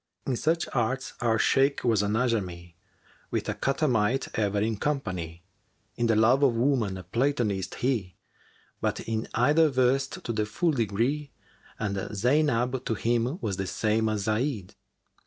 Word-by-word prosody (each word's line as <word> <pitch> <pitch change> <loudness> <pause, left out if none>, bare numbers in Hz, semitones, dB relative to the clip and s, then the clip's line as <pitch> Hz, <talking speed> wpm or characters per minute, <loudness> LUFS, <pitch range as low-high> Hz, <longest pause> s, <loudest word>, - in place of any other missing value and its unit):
In 130 - 0
such 165 +6 0
arts 130 +2 -1
our 115 -2 +2
Shaykh 135 +5 +2
was 115 -4 +3
an 105 0 0
Ajamн[FN#382] 95 -8 -1 0.3
* - - -31
With - - -2
a - - 0
catamite 135 -3 +1
ever 105 -2 0
in 110 +1 0
company; 90 - -3 0.5
In 120 - 0
the 115 - +3
love 120 +5 +4
of 135 -5 +4
woman, 115 -6 +1
a 90 - -8
Platonist 115 - -1
he[FN#383] 115 -8 0 0.3
* - - -34
But - - -1
in 110 -1 -3
either 150 +7 +4
versed 135 +1 +1
to - - -3
the 105 -1 -1
full 170 +9 +1
degree, 125 +4 -1 0.5
And 100 -2 -2
Zaynab 125 +4 +1
to 115 - -1
him 120 - 0
was 100 -5 -2
the 95 -1 -2
same 110 +3 +1
as 105 -1 -1
Zayd. 110 -2 -1
115 Hz, 160 wpm, -27 LUFS, 105-135 Hz, 0.5 s, love